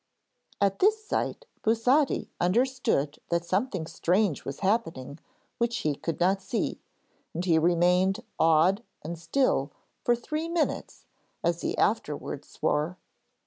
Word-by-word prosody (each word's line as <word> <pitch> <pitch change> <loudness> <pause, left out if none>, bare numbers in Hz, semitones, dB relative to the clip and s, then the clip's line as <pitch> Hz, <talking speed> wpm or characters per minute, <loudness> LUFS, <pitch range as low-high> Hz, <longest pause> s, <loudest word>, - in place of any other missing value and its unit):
At 200 -1 +1
this 430 +2 +3
sight - - -2 0.2
Busotti 250 +6 +2
understood 195 - +1
that 170 0 0
something 190 -2 -1
strange 180 +1 +1
was 140 - -6
happening 165 - -1 0.4
which 235 0 +1
he 150 - +2
could 165 +3 -4
not 190 +2 +2
see, 235 +3 -2 0.5
and 175 +2 -2
he 165 -3 +4
remained 180 +4 +3 0.2
awed 165 +6 +4 0.2
and 165 +3 -4
still 165 - +1 0.3
for 240 - +3
three 305 +7 -4
minutes, 335 -2 -2 0.4
as 170 0 +1
he - - -2
afterwards - - -1
swore. 155 +5 -1
190 Hz, 125 wpm, -28 LUFS, 165-240 Hz, 0.5 s, he